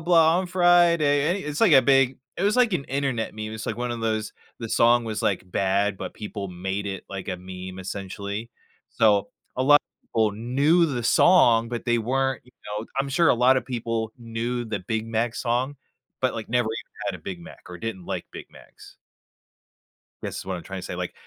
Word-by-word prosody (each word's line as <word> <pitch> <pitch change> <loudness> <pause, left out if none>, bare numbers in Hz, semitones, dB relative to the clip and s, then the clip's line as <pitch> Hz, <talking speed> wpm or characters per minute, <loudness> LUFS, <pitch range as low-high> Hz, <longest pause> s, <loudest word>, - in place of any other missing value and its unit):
blah. 165 0 +4
On 185 - -1
Friday. 175 -2 +3
Eh, - - -5
it's 150 0 -3
like 220 -7 +5
a 135 -2 +8
big 135 -2 +3 0.2
it - - -3
was 205 +2 +3
like 245 -4 +4
an 155 -6 -1
internet 135 -5 -2
meme, 110 0 -5
it's 110 - -6
like 110 - -2
one 120 0 -3
of 120 - -3
those, 110 -1 -1 0.3
the 115 - -4
song 120 +2 +4
was, 110 -2 -4
like, 95 - +1
bad, 100 +2 +1
but - - -6
people 105 -2 -6
made 95 +2 -4
it 95 -1 -4
like 95 -1 -6
a 95 - -3
meme 95 +1 -8
essentially. 100 +3 -5 0.4
So, 105 -2 +3 0.3
a 130 - +1
lot 145 +2 +7
of - - -45
people 110 -2 +2
knew 140 - +2
the 130 -6 -2
song, 115 -4 +5
but 120 0 -4
they 120 -1 +2
weren't, 135 +2 0
you 125 - -21
know 105 +2 -5
I'm 135 0 0
sure 165 +5 +3
a - - +5
lot 125 +2 +4
of - - -2
people 115 -3 -3
knew 120 +1 -3
the 110 -2 -3
Big 110 +4 -3
Mac 115 +1 -1
song, 125 +3 -1 0.5
but, 130 - +1
like, 110 -1 -6
never 120 -1 +1
even 110 - -6
had - - -2
a - - -32
Big 190 -3 -6
Mac, 175 - -13
or 90 - -8
didn't 95 -2 -6
like - - -3
Big - - -9
Macs. - - -16 1.3
Guess - - -4
is - - -7
what 95 0 -3
I'm 85 - -9
trying 95 -1 -6
to - - -7
say, - - -5
like, 90 0 -4
115 Hz, 215 wpm, -25 LUFS, 105-140 Hz, 1.3 s, a